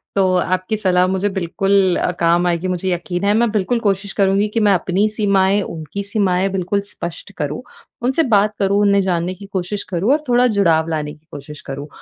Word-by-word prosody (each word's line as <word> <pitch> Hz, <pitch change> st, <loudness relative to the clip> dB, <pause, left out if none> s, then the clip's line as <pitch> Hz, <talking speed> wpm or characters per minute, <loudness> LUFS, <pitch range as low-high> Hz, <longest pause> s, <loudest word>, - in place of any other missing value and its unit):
तो 190 Hz, -2 st, +2 dB
आपकी 185 Hz, +4 st, -1 dB
सलाह 185 Hz, -3 st, +2 dB
मुझे 190 Hz, +2 st, 0 dB
बिल्कुल 190 Hz, +1 st, +2 dB
अ, 180 Hz, -, 0 dB
काम 170 Hz, +1 st, +3 dB
आएगी 175 Hz, +1 st, -1 dB
मुझे 185 Hz, 0 st, -1 dB
यकीन 175 Hz, +2 st, -4 dB
है, 205 Hz, +1 st, +3 dB
मैं 230 Hz, +1 st, +2 dB
बिल्कुल 220 Hz, +3 st, 0 dB
कोशिश 200 Hz, -2 st, -1 dB
करूँगी 200 Hz, +1 st, +2 dB
कि 230 Hz, -, +1 dB
मैं 200 Hz, -, +5 dB
अपनी 185 Hz, +3 st, +1 dB
सीमाएँ, 200 Hz, -2 st, +2 dB
उनकी 165 Hz, +3 st, -6 dB
सीमाएँ 195 Hz, -2 st, 0 dB
बिल्कुल 190 Hz, +1 st, -1 dB
स्पष्ट 170 Hz, +4 st, -7 dB
करूँ, 150 Hz, +5 st, -3 dB, 0.4 s
उनसे 265 Hz, +6 st, +2 dB
बात 210 Hz, +1 st, +3 dB
करूँ, 200 Hz, +1 st, +2 dB
उन्हें 200 Hz, -1 st, +3 dB
जानने 180 Hz, -1 st, -1 dB
की 200 Hz, +2 st, -12 dB
कोशिश 195 Hz, +1 st, -3 dB
करूँ 190 Hz, +9 st, +1 dB
और 300 Hz, +1 st, 0 dB
थोड़ा 245 Hz, +1 st, +4 dB
जुड़ाव 165 Hz, -4 st, +3 dB
लाने 150 Hz, -2 st, -3 dB
की 150 Hz, -, -22 dB
कोशिश 145 Hz, +1 st, -9 dB
करूँ। 140 Hz, +2 st, -6 dB
190 Hz, 195 wpm, -18 LUFS, 175-200 Hz, 0.4 s, मैं